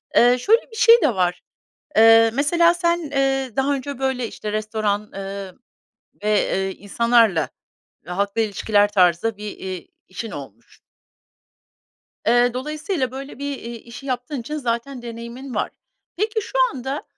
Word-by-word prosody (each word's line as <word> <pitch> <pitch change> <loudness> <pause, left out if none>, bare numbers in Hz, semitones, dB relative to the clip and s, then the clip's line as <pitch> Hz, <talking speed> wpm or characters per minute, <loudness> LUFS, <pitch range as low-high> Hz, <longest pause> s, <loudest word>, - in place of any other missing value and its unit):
eee, 245 +1 +6
şöyle, 450 - +4
bir - - -11
şey 465 -1 +7
de 255 -9 +2
var: 180 -1 0 0.6
Eee, 225 0 +7
mesela 335 +5 +4
sen, 345 0 +1
eee, 270 -2 +1
daha 275 +2 +1
önce, 275 0 -5
böyle, 260 -3 -1
işte, 210 -1 -6
restoran, 215 -1 -2
eee, 195 -1 -6 0.7
ve, 215 0 +3 0.2
eee, 190 0 -1
insanlarla 220 -3 +2 0.6
halkla 200 +4 -1
ilişkiler 205 -1 +2
tarzda 185 +3 +3
bir, 210 -1 -6
eee, 185 -2 -6 0.2
işin 210 +4 -6
olmuş. 120 -5 -11 1.5
Eee, 240 +1 +4
dolayısıyla, 300 - -2
böyle, 275 +1 -8
bir, 285 -1 -3
eee, 235 0 -7
işi 235 +4 -11
yaptığın 255 +1 -3
için 300 +6 -5
zaten 245 0 -3
deneyimin 235 +3 -8
var. - - -1 0.5
Peki, 435 +2 0
şu - - -5
anda, 270 +1 -4
235 Hz, 140 wpm, -22 LUFS, 210-275 Hz, 1.5 s, şey